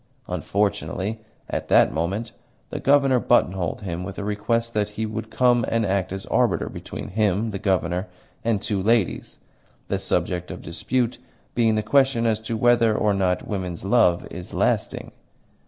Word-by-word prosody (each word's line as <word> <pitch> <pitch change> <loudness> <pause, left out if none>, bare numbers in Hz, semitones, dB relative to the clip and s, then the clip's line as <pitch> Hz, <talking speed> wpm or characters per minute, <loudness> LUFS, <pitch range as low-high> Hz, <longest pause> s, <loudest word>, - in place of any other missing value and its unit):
Unfortunately 100 +1 -1 0.3
at - - -3
that - - +5
moment 95 +9 -2 0.4
the - - -3
Governor 140 -2 +4
buttonholed 95 -8 +1
him 90 -3 -4
with 100 +1 -7
a - - -3
request 115 +3 -1
that 105 -1 0
he 110 - 0
would 110 +1 -5
come 120 +1 +3
and 115 -1 +1
act 95 -1 0
as 95 0 -5
arbiter - - +1
between - - -7
him 105 +1 +1
(the 100 - -4
Governor) 90 -1 0 0.4
and 115 -3 0
two 100 -3 -1
ladies 110 -2 +1 0.5
the - - 0
subject 90 0 -1
of - - -7
dispute 120 +9 -1 0.3
being 115 -2 +3
the 110 - 0
question 135 0 +3
as 110 -2 +2
to 110 +1 -4
whether 115 -1 +4
or 105 -1 +2
not 95 -2 0
woman's 95 -4 -4
love 100 -5 +3
is 90 0 -8
lasting. - - 0
105 Hz, 160 wpm, -24 LUFS, 95-115 Hz, 0.5 s, that